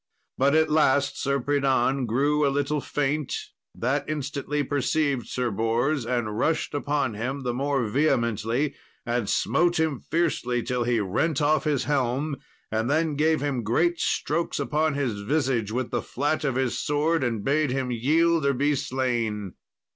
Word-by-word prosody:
But 140 Hz, +3 st, +3 dB
at 160 Hz, -1 st, +3 dB
last 145 Hz, -2 st, +2 dB
Sir 140 Hz, 0 st, +1 dB
Pridan 135 Hz, -1 st, +1 dB
grew 145 Hz, +6 st, +2 dB
a 140 Hz, -, +4 dB
little 145 Hz, +1 st, 0 dB
faint; 145 Hz, +1 st, -1 dB, 0.4 s
that 140 Hz, +5 st, -1 dB
instantly 145 Hz, 0 st, -2 dB
perceived 140 Hz, -1 st, 0 dB
Sir 125 Hz, -2 st, -2 dB
Bors, 115 Hz, +6 st, 0 dB
and 115 Hz, -4 st, -1 dB
rushed 160 Hz, +2 st, 0 dB
upon 145 Hz, -4 st, -1 dB
him 130 Hz, +6 st, -4 dB
the 125 Hz, -1 st, -1 dB
more 135 Hz, -1 st, 0 dB
vehemently, 120 Hz, 0 st, +1 dB, 0.3 s
and 120 Hz, -3 st, -1 dB
smote 175 Hz, 0 st, +2 dB
him 155 Hz, -5 st, 0 dB
fiercely, 135 Hz, -7 st, -1 dB
till 125 Hz, -1 st, -1 dB
he 120 Hz, -1 st, +2 dB
rent 115 Hz, -, 0 dB
off 155 Hz, +1 st, +2 dB
his 145 Hz, -4 st, +1 dB
helm, 140 Hz, +1 st, 0 dB, 0.3 s
and 110 Hz, +2 st, 0 dB
then 155 Hz, +1 st, +1 dB
gave 155 Hz, 0 st, +2 dB
him 140 Hz, -4 st, -1 dB
great 165 Hz, +11 st, +1 dB
strokes 170 Hz, -, -1 dB
upon 155 Hz, 0 st, 0 dB
his 120 Hz, -8 st, -2 dB
visage 125 Hz, -3 st, 0 dB
with 125 Hz, +2 st, -2 dB
the 120 Hz, -, 0 dB
flat 145 Hz, +5 st, -1 dB
of 135 Hz, -4 st, 0 dB
his 130 Hz, -2 st, 0 dB
sword, 150 Hz, +1 st, +1 dB
and 115 Hz, -5 st, -1 dB
bade 150 Hz, +1 st, +1 dB
him 130 Hz, -1 st, -1 dB
yield 160 Hz, +7 st, +2 dB
or 140 Hz, 0 st, +2 dB
be 145 Hz, +3 st, +2 dB
slain. 120 Hz, -7 st, -2 dB
140 Hz, 160 wpm, -25 LUFS, 120-150 Hz, 0.4 s, a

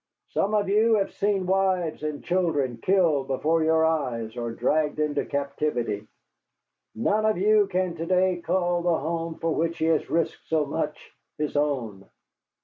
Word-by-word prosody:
Some 205 Hz, +2 st, 0 dB
of 205 Hz, -2 st, +1 dB
you 220 Hz, +3 st, +4 dB
have 200 Hz, -2 st, -1 dB
seen 200 Hz, -2 st, 0 dB
wives 185 Hz, -4 st, 0 dB
and 150 Hz, -1 st, -4 dB
children 155 Hz, -9 st, 0 dB
killed 160 Hz, -3 st, +2 dB
before 160 Hz, +4 st, +1 dB
your 160 Hz, 0 st, +3 dB
eyes 125 Hz, -8 st, -1 dB
or 120 Hz, -1 st, -3 dB
dragged 150 Hz, +6 st, 0 dB
into 150 Hz, -1 st, 0 dB
captivity. 140 Hz, -7 st, -2 dB, 0.9 s
None 205 Hz, -, +1 dB
of 215 Hz, -2 st, +2 dB
you 210 Hz, +2 st, +4 dB
can 185 Hz, -2 st, -1 dB
to 165 Hz, -, -4 dB
day 185 Hz, 0 st, +2 dB
call 175 Hz, 0 st, 0 dB
the 170 Hz, -1 st, +2 dB
home 165 Hz, +2 st, -3 dB
for 165 Hz, 0 st, -1 dB
which 165 Hz, +1 st, -1 dB
he 160 Hz, -, 0 dB
has 160 Hz, -2 st, +1 dB
risked 165 Hz, -1 st, -1 dB
so 155 Hz, -2 st, +1 dB
much -, -, -4 dB, 0.2 s
his 150 Hz, -1 st, -3 dB
own. 125 Hz, -10 st, -2 dB
160 Hz, 160 wpm, -25 LUFS, 145-185 Hz, 0.9 s, you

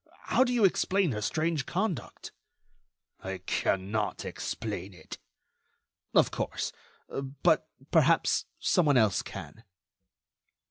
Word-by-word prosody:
How -, -, +3 dB
do 250 Hz, -, -1 dB
you 235 Hz, -4 st, +4 dB
explain 190 Hz, -2 st, +2 dB
her 105 Hz, -2 st, -3 dB
strange 155 Hz, +4 st, 0 dB
conduct?" 185 Hz, -, -3 dB, 0.9 s
"I 95 Hz, 0 st, -5 dB
cannot 95 Hz, +3 st, -1 dB
explain 100 Hz, -4 st, -5 dB
it." 80 Hz, -, -10 dB, 1.0 s
"Of -, -, +5 dB
course; -, -, -2 dB, 0.4 s
but, 135 Hz, +1 st, 0 dB, 0.2 s
perhaps, -, -, +4 dB
someone 150 Hz, -6 st, +3 dB
else 110 Hz, -4 st, +3 dB
can." 95 Hz, +3 st, -9 dB
120 Hz, 100 wpm, -29 LUFS, -, 1.0 s, Of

